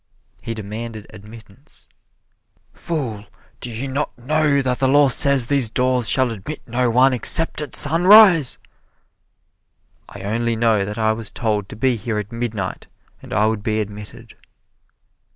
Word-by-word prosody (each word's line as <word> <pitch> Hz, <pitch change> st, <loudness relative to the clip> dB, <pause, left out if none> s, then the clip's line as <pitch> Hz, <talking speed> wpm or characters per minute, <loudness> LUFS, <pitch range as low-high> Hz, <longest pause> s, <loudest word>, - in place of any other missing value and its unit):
He 115 Hz, -, -6 dB
demanded 110 Hz, +1 st, -8 dB
admittance. 110 Hz, +5 st, -16 dB, 0.9 s
"Fool, 115 Hz, -, -6 dB, 0.3 s
do 125 Hz, -, -6 dB
you 120 Hz, +4 st, -6 dB
not 135 Hz, +2 st, -4 dB
know 145 Hz, +2 st, 0 dB
that 125 Hz, -1 st, -2 dB
the 135 Hz, -, +1 dB
law 145 Hz, +1 st, +4 dB
says 140 Hz, -1 st, +6 dB
these 135 Hz, -3 st, +1 dB
doors 125 Hz, 0 st, 0 dB
shall 130 Hz, -3 st, +2 dB
admit 115 Hz, +8 st, -9 dB
no 125 Hz, +1 st, -1 dB
one 130 Hz, +3 st, +3 dB
except 155 Hz, +6 st, +1 dB
at 150 Hz, -, -6 dB
sunrise?" 175 Hz, -, +5 dB, 1.5 s
"I 100 Hz, -, -12 dB
only 115 Hz, +3 st, -2 dB
know 110 Hz, -3 st, +1 dB
that 105 Hz, +2 st, -7 dB
I 110 Hz, -1 st, 0 dB
was 110 Hz, 0 st, -6 dB
told 105 Hz, -3 st, -3 dB
to -, -, -10 dB
be 125 Hz, +2 st, 0 dB
here 110 Hz, +1 st, -5 dB
at 105 Hz, +1 st, -6 dB
midnight 115 Hz, -5 st, -5 dB, 0.3 s
and -, -, -14 dB
I 105 Hz, -, +1 dB
would 110 Hz, -1 st, -2 dB
be 110 Hz, +1 st, -2 dB
admitted." 105 Hz, 0 st, -9 dB
115 Hz, 150 wpm, -19 LUFS, 110-135 Hz, 1.5 s, says